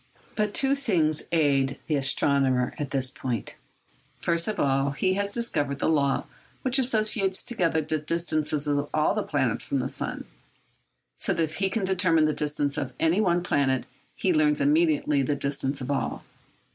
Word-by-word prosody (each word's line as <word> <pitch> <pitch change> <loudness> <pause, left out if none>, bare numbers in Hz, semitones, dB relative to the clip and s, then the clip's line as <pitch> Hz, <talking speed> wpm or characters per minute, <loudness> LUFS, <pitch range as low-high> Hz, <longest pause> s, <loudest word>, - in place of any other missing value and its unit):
But 210 -1 -1
two 270 0 +3
things 180 - +1
aid 140 -5 +2
the 155 - -2
astronomer 135 -2 +2
at 145 -2 -3
this 130 -2 -1
point. 120 -6 -4 0.6
First 170 -1 +1
of 215 -1 -3
all, 135 0 +1
he 185 +6 0
has 200 +1 -1
discovered 145 - -2
the - - -1
law 140 -4 +1 0.4
which 260 +1 +2
associates 215 -6 +2
together 170 -8 0
the 155 +1 -2
distances 155 -1 -1
of 145 0 -1
all 155 +4 +2
the 215 - -1
planets 135 - -1
from 140 - -2
the 130 0 -1
sun; - - -4 0.9
so - - -1
that 165 - +1
if 160 0 -4
he 195 -1 +1
can 215 +1 -2
determine 180 -4 +3
the 155 - +1
distance 145 -1 -2
of 130 - -4
any 165 +6 +2
one 175 -3 +1
planet, 135 -6 +1 0.3
he 185 - +1
learns 150 -1 +2
immediately 150 -1 +2
the 145 +2 0
distances 140 0 -3
of 130 +2 -3
all. 140 - -2
155 Hz, 170 wpm, -26 LUFS, 140-185 Hz, 0.9 s, two